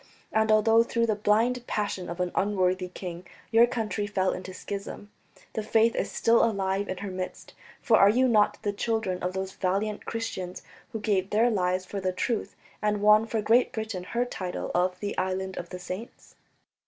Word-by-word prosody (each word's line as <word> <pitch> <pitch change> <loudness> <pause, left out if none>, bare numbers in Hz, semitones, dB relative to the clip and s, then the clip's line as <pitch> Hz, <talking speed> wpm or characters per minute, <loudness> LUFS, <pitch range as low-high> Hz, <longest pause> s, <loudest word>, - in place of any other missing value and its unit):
And 220 0 +2
although 225 +1 +5
through 235 0 +1
the 220 -2 +1
blind 225 +4 +2
passion 200 -3 -2
of 170 +1 -6
an 180 -1 0
unworthy 185 -2 +1
king 180 -1 -8 0.2
your 230 +1 +6
country 215 -4 -2
fell 190 -2 +1
into 185 0 -7
schism, 200 +2 -7 0.4
the 220 - -2
Faith 225 +2 +3
is - - -2
still 230 0 +3
alive 200 -2 0
in 185 - -3
her 195 - -4
midst, 185 0 -6 0.3
for 230 -5 +5
are 200 - +7
you 255 +5 +3
not 210 -3 +3
the 205 -2 0
children 210 -4 -1
of 180 +1 -2
those 190 0 -3
valiant 200 +3 -2
Christians... 190 -6 -4 0.3
who 220 - -4
gave 200 -3 0
their 230 +3 +3
lives 185 -2 0
for 200 +1 -5
the 185 -1 -1
truth, 220 +4 -2 0.3
and 210 0 +1
won 210 +1 +6
for 225 -2 -1
Great 235 +4 +4
Britain 220 -6 -4
her 240 +5 -1
title 185 -7 -4
of 180 +1 +1
the 205 - -3
Island 190 0 -2
of 175 - -6
Saints?" 185 +5 -8
205 Hz, 185 wpm, -27 LUFS, 185-225 Hz, 0.4 s, are